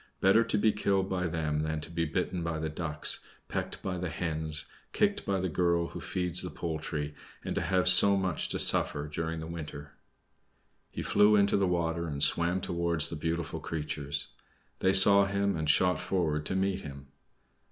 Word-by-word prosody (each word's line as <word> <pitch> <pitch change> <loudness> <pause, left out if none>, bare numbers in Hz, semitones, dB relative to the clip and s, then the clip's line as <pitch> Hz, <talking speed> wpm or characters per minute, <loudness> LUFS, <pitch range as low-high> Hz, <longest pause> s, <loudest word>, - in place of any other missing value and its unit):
Better 95 +4 +4
to 115 - -1
be 110 +1 +3
killed 100 -2 0
by 90 -1 -1
them 75 -2 -2
than 80 0 -2
to 80 - -6
be 85 -1 -1
bitten 90 +3 -2
by 85 -1 -2
the 80 0 -3
Ducks, 75 -1 -1 0.3
pecked - - -4
by 95 -1 -3
the 90 -1 -3
Hens, 80 -3 -1 0.3
kicked - - 0
by 95 -1 0
the 95 - -1
girl 85 0 0
who - - -8
feeds 90 -1 -2
the - - -4
poultry, 75 -3 -4 0.3
and - - -2
to - - -1
have 90 -1 +1
so 100 +2 +6
much 95 -4 -1
to - - +1
suffer 75 +1 +1
during 80 +2 -4
the - - -6
winter!" 75 -3 -8 1.0
He - - -6
flew 105 +1 +4
into 100 -1 +3
the 100 -1 +2
water 85 -1 -1
and 70 -2 -1
swam 85 +2 +3
towards 85 -3 0
the - - -5
beautiful 80 +1 -3
creatures. 75 -2 -2 0.5
They 95 - +3
saw 100 +1 +7
him 100 0 0
and 80 -2 -2
shot 90 +4 +3
forward 75 -5 -1
to - - -2
meet 95 0 0
him. 70 -3 -10
85 Hz, 185 wpm, -29 LUFS, 80-95 Hz, 1.0 s, saw